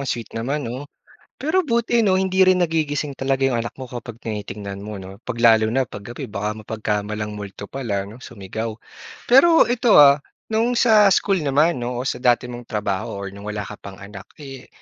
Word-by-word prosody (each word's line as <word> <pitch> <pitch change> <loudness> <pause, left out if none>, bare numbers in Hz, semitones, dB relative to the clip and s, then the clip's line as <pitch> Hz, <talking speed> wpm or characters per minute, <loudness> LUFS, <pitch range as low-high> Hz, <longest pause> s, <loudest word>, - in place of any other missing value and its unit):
sweet 115 -2 -4
naman 135 +5 -2
'no? 130 +5 -6 0.5
Pero 325 +6 +1
buti 235 -2 +1
'no 185 -2 +3
hindi 190 0 +3
rin 185 -1 +4
nagigising 150 -4 -1
talaga 135 0 +1
'yong 120 -3 0
anak - - -5
mo 130 - -7
kapag 120 -1 -8
tinitingnan 100 -2 -6
mo 105 -2 -6
'no? 95 +1 -10
'Pag 115 -1 -5
lalo 110 -2 +5
na 130 -2 +1
'pag 100 -1 -9
gabi - - -7
baka 105 0 -3
mapagkamalang 105 -1 -3
multo 100 -1 -8
pala 100 -4 -3
'no? 110 +5 -12
Sumigaw. 110 +1 -6 0.5
Pero 325 +7 +7
ito 245 -1 +3
ah, 140 0 +8 0.3
no'ng 235 +2 +1
sa 215 -4 +6
school 195 -2 +2
naman 145 +1 +2
'no 120 0 -3
o 130 - -3
sa 125 - -3
dati 125 -1 +3
mong 120 -1 -9
trabaho 100 -2 -3
or 100 0 -5
no'ng 100 0 -11
wala 105 -1 -3
ka - - -9
pang 95 -1 -10
anak, 100 0 -10 0.2
eh, 135 -3 -10
120 Hz, 195 wpm, -21 LUFS, 105-155 Hz, 0.5 s, ah